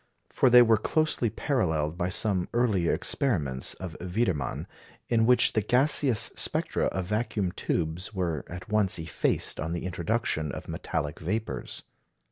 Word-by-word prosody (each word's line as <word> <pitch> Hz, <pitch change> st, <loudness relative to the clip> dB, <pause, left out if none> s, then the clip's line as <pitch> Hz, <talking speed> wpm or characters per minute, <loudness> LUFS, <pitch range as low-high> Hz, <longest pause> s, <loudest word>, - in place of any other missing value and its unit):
For 130 Hz, -, +3 dB
they 125 Hz, 0 st, +9 dB
were 110 Hz, -2 st, +4 dB
closely 150 Hz, -1 st, +1 dB
paralleled 80 Hz, -, 0 dB
by 90 Hz, 0 st, -1 dB
some 95 Hz, -2 st, 0 dB
earlier 105 Hz, -8 st, +2 dB
experiments 75 Hz, -, 0 dB
of 90 Hz, -3 st, -7 dB
Wiedemann, 90 Hz, -, -1 dB, 0.4 s
in 115 Hz, -1 st, +3 dB
which 125 Hz, -1 st, +5 dB
the 110 Hz, -, +2 dB
gaseous 125 Hz, 0 st, +2 dB
spectra -, -, 0 dB
of 95 Hz, 0 st, -2 dB
vacuum 105 Hz, -2 st, -1 dB
tubes 85 Hz, +4 st, -2 dB
were 85 Hz, -7 st, -2 dB
at 90 Hz, +1 st, -8 dB
once 105 Hz, -3 st, +1 dB
effaced 80 Hz, -1 st, -1 dB
on 80 Hz, +2 st, -2 dB
the 85 Hz, -, -4 dB
introduction 90 Hz, -5 st, -1 dB
of -, -, -7 dB
metallic -, -, -3 dB
vapours. 105 Hz, +7 st, -3 dB
95 Hz, 140 wpm, -28 LUFS, 85-115 Hz, 0.4 s, they